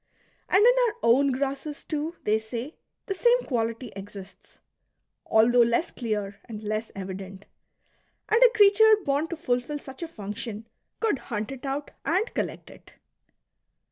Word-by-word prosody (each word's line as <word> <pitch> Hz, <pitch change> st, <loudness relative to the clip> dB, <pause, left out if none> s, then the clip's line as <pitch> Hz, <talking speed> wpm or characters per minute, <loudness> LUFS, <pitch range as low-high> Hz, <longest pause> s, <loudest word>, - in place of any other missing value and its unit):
^ -, -, -53 dB, 0.5 s
And 400 Hz, +4 st, +5 dB
in -, -, +7 dB
our 435 Hz, -, -3 dB
own 270 Hz, +5 st, +4 dB
grasses 275 Hz, +3 st, -3 dB
too, 310 Hz, +2 st, -3 dB
they 215 Hz, +1 st, +2 dB
say, 235 Hz, +6 st, -6 dB, 0.3 s
the 390 Hz, -, -2 dB
same 485 Hz, +5 st, +3 dB
quality 230 Hz, -1 st, -2 dB
exists, 195 Hz, -1 st, -11 dB, 0.7 s
although 240 Hz, +2 st, +5 dB
less 235 Hz, +8 st, +2 dB
clear 210 Hz, -4 st, -3 dB
and 220 Hz, -2 st, -8 dB
less 215 Hz, +1 st, -3 dB
evident; 190 Hz, 0 st, -7 dB, 0.8 s
and 450 Hz, +2 st, +3 dB
a 470 Hz, -1 st, +5 dB
creature 430 Hz, +1 st, +7 dB
born 285 Hz, +3 st, +1 dB
to 335 Hz, -, -5 dB
fulfil 250 Hz, -1 st, -1 dB
such 270 Hz, 0 st, -11 dB
a 335 Hz, -, -3 dB
function 215 Hz, -3 st, -6 dB, 0.3 s
could 440 Hz, -, +1 dB
hunt 215 Hz, -1 st, -4 dB
it 270 Hz, 0 st, -7 dB
out 280 Hz, +2 st, -3 dB
and 370 Hz, -, 0 dB
collect -, -, -4 dB
it. -, -, -17 dB
255 Hz, 150 wpm, -26 LUFS, 215-325 Hz, 0.8 s, in